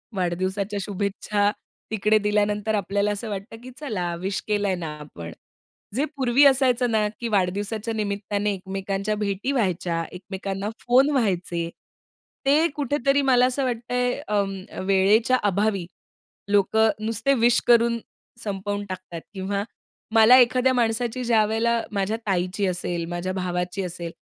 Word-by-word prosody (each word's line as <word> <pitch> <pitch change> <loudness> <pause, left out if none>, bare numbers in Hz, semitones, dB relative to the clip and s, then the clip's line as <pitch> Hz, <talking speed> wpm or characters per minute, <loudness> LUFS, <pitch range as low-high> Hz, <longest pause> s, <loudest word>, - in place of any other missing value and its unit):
वाढदिवसाच्या 190 +3 -1
शुभेच्छा 205 +1 -1 0.4
तिकडे 215 0 +3
दिल्यानंतर 210 +1 +1
आपल्याला 205 +1 0
असं 210 +2 -4
वाटतं, 205 +3 -6
की 255 - -9
चला 185 - -3
विश 190 +1 -2
केलंय 205 -3 +1
ना 170 -3 -5
आपण, 85 - -9 0.6
जे 285 +4 +1
पूर्वी 260 +2 +4
असायचं 255 -3 +4
ना, 215 -1 +2
की 235 - -1
वाढदिवसाच्या 205 +3 -1
निमित्ताने 205 -1 -1
एकमेकांच्या 195 +2 -3
भेटी 205 +5 -2
व्हायच्या, 175 -7 0
एकमेकांना 195 +2 -5 0.2
फोन 260 +4 +5
व्हायचे. 180 -9 0 0.8
ते 305 +4 +4
कुठेतरी 280 0 +1
मला 250 -2 +4
असं 260 +2 -1
वाटतंय 245 +1 -1
अ, 210 -1 +2 0.4
वेळेच्या 210 +6 +4
अभावी 200 -2 0 0.7
लोकं 220 +2 +4 0.2
नुसते 230 +5 +1
विश 240 -1 +5
करून 235 -1 +4 0.4
संपवून 205 0 -3
टाकतात 180 -3 -7
किंवा 200 +1 -2 0.5
मला 225 +3 +8
एखाद्या 255 +1 +4
माणसाची 240 +1 0
ज्यावेळेला 230 +1 +2
माझ्या 200 +3 0
ताईची 185 +1 0
असेल, 175 -1 -2
माझ्या 175 +1 -3
भावाची 180 +1 -2
असेल, 170 -1 -5
205 Hz, 125 wpm, -24 LUFS, 190-235 Hz, 0.8 s, मला